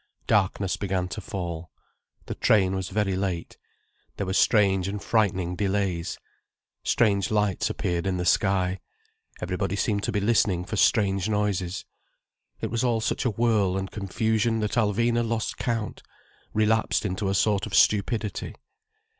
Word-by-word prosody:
Darkness 100 -1 +1
began 95 -2 -1
to - - -5
fall. 85 -3 -5 0.6
The - - -4
train 95 -4 +3
was 95 -1 -3
very 100 -1 0
late. 95 -3 -3 0.6
There 100 - -2
were 95 - -2
strange 95 -3 +3
and 100 +1 -3
frightening 95 -6 0
delays. 95 -3 -1 0.7
Strange 100 -5 +2
lights 105 -3 +1
appeared 85 +1 -2
in 95 -1 0
the 90 - -2
sky, 95 0 +2 0.6
everybody - - -2
seemed 105 -4 0
to - - -2
be 105 - 0
listening 100 -4 +2
for 110 - -4
strange 100 -2 +2
noises. 100 -3 -1 0.8
It - - -3
was 115 0 0
all 120 -3 +2
such 110 - -1
a - - +3
whirl 105 -4 +1
and 95 0 -4
confusion 110 +3 0
that 105 - -1
Alvina 115 +1 +2
lost 115 -1 -2
count, 115 -4 -3 0.5
relapsed 110 +1 +1
into 95 +1 -1
a 95 - 0
sort 100 -1 +2
of - - -3
stupidity. 105 +1 +1
100 Hz, 145 wpm, -26 LUFS, 95-110 Hz, 0.8 s, train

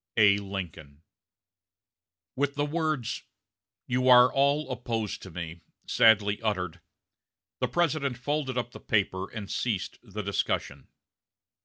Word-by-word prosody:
"A. 100 -2 +6
LINCOLN." 85 -7 -7 1.3
With 140 +1 0
the 145 0 0
words, 155 -5 -1 0.6
"You 125 +1 +1
are 125 0 +8
all 140 +2 +2
opposed 115 -4 -3
to 95 - -9
me," 85 -1 -7 0.2
sadly 105 -2 +4
uttered, 90 -6 -2 0.8
the - - +1
President 155 -7 0
folded 130 0 -2
up 120 -1 -2
the - - -10
paper 95 -3 0
and 105 -3 -6
ceased 105 -4 -2
the 105 -2 -6
discussion. 100 0 -2
115 Hz, 120 wpm, -28 LUFS, 95-135 Hz, 1.3 s, are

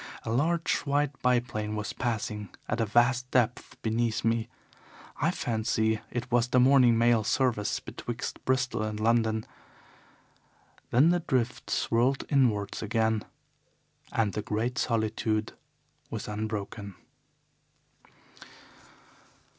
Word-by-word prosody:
A - - -3
large 165 +7 +1
white 145 0 0
biplane 120 -4 0
was 105 0 -3
passing 105 -4 -3 0.2
at 115 - -1
a 115 - +1
vast 120 +3 +2
depth 125 -2 0
beneath 115 0 0
me. 115 0 +1 0.7
I - - +1
fancy 110 -1 0
it 120 0 -4
was 120 0 +3
the 125 - +3
morning 125 -2 +6
mail 115 -1 +4
service 115 -3 +1
betwixt - - -6
Bristol 130 -3 0
and 110 0 -3
London. 110 -1 +2 1.4
Then 135 +7 +5
the 175 0 +3
drift 130 -7 -1
swirled 125 +4 +1
inwards 115 -8 +1
again 110 0 +1 0.9
and 110 -3 +1
the 105 - -2
great 115 +4 -2
solitude 110 -1 0 0.6
was - - -5
unbroken. 105 -1 -4
115 Hz, 110 wpm, -28 LUFS, 110-125 Hz, 1.4 s, morning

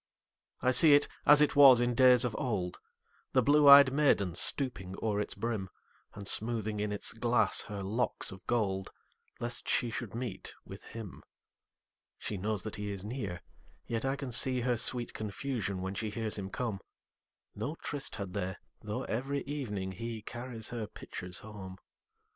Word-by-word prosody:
I 130 - +4
see 145 +3 +6
it 145 - +3 0.2
as 145 0 +8
it 150 - +2
was 135 -4 +8
in 120 0 +1
days 125 0 +6
of 115 -3 -3
old, 95 -8 -3 0.5
The 130 - +4
blue 145 +2 +5
ey'd 140 -1 +9
maiden 135 - +2
stooping 95 - 0
o'er 105 -2 -1
its - - -4
brim, 110 -5 -3 0.5
And 100 -1 -7
smoothing 110 -2 +2
in 105 0 -2
its 105 - -1
glass 115 -2 +3
her 100 -1 -6
locks 110 +3 -2
of 95 -2 -11
gold, 95 -5 -1 0.5
Lest 120 0 -4
she 120 - +1
should 110 -1 -6
meet 115 -5 -6
with - - -10
him. 110 -5 -9 1.0
She 105 - -5
knows 100 0 -2
that 110 - -6
he 105 0 -4
is 100 -1 -5
near, 105 -7 -5 0.4
yet 115 -1 -3
I 135 0 0
can 135 -2 -6
seeHer 125 0 +3
sweet 120 0 0
confusion 105 -2 -4
when 95 +1 -4
she 110 +2 -3
hears 110 0 -3
him 95 -2 -5
come.No 115 - -8
tryst 145 -3 -4
had 100 -3 -6
they, 95 -2 -3 0.3
though - - -4
every 135 +5 -3
evening 105 -10 -4
heCarries 115 +2 -6
her 115 -3 -5
pitchers 90 -2 -5
home. 95 -3 -10
110 Hz, 160 wpm, -31 LUFS, 100-125 Hz, 1.0 s, ey'd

